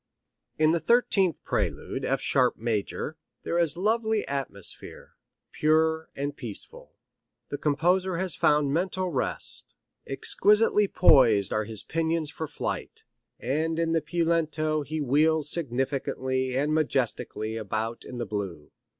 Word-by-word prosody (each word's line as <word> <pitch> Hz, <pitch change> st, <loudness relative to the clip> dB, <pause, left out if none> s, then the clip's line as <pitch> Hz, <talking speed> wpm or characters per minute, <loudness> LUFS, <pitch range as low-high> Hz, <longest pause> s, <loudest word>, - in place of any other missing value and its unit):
In 155 Hz, 0 st, +4 dB
the 170 Hz, -, +2 dB
thirteenth 195 Hz, -, +2 dB
prelude, -, -, -2 dB
F -, -, 0 dB
sharp 125 Hz, -2 st, +2 dB
major, 115 Hz, +7 st, -2 dB, 0.3 s
here 170 Hz, -, 0 dB
is 165 Hz, -1 st, +1 dB
lovely 220 Hz, +2 st, +1 dB
atmosphere, 135 Hz, -9 st, -6 dB, 0.4 s
pure 160 Hz, +1 st, +2 dB
and 140 Hz, +1 st, -3 dB
peaceful. 115 Hz, -6 st, -9 dB, 0.5 s
The 145 Hz, -, -4 dB
composer 175 Hz, +5 st, +1 dB
has 185 Hz, -3 st, +2 dB
found 150 Hz, -2 st, +2 dB
mental 185 Hz, +2 st, -1 dB
rest. 135 Hz, -, -3 dB, 0.3 s
Exquisitely 210 Hz, +8 st, +3 dB
poised 120 Hz, -, +5 dB
are 110 Hz, 0 st, 0 dB
his 110 Hz, -1 st, -4 dB
pinions 160 Hz, -1 st, -1 dB
for 160 Hz, -1 st, -5 dB
flight, -, -, -5 dB, 0.4 s
and 155 Hz, +6 st, -1 dB
in 165 Hz, 0 st, 0 dB
the 165 Hz, -1 st, +2 dB
piu 170 Hz, +1 st, -1 dB
lento 155 Hz, -2 st, +1 dB
he 155 Hz, +2 st, -4 dB
wheels 150 Hz, +2 st, +2 dB
significantly 130 Hz, -2 st, -1 dB
and 145 Hz, +3 st, +1 dB
majestically 130 Hz, -7 st, -1 dB
about 110 Hz, +1 st, -3 dB
in 125 Hz, -, -8 dB
the 120 Hz, -, -2 dB
blue. 95 Hz, -7 st, -5 dB
150 Hz, 130 wpm, -27 LUFS, 130-165 Hz, 0.5 s, poised